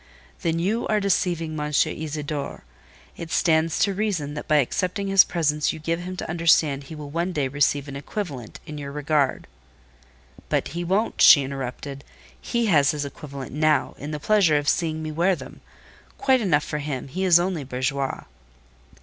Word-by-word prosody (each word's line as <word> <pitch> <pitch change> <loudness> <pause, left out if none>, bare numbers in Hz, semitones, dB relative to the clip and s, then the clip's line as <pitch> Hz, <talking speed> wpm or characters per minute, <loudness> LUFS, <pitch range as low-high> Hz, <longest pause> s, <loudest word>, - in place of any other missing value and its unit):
"Then 165 -2 0
you 200 +8 0
are 215 - +2
deceiving 170 -5 0
M. 150 - -2
Isidore. 150 -1 -2 0.5
It 170 - -7
stands 160 -1 +2
to 200 - +1
reason 190 -8 -2
that 150 - -6
by 155 - +3
accepting 185 - 0
his 195 -1 +7
presents 150 -3 0
you - - -7
give 165 +2 -2
him 180 +1 -6
to - - -5
understand 160 -4 +2
he 155 - -9
will 150 -2 -8
one 170 +3 -1
day 145 -4 0
receive 145 +1 +1
an 140 - -7
equivalent, 140 - -6
in 150 -1 -7
your 140 -1 -6
regard…" 145 -1 0 1.0
"But - - 0
he 170 +3 -4
won't," 195 +6 0
she 140 - +9
interrupted: 135 +1 -6 0.4
"he 235 -1 -1
has 150 -9 +4
his 145 -1 -1
equivalent 140 -2 -8
now, 155 +1 +1
in 145 - -6
the 150 -1 -4
pleasure 180 -3 +3
of 145 0 -2
seeing 160 -1 0
me 155 - -4
wear 175 +5 +2
them—quite 260 +7 -4
enough 155 -8 +2
for 150 - -3
him: 140 -3 -4
he 185 +8 -4
is 175 -2 +6
only 175 -4 -1
bourgeois." 135 +1 -2
155 Hz, 175 wpm, -24 LUFS, 145-175 Hz, 1.0 s, she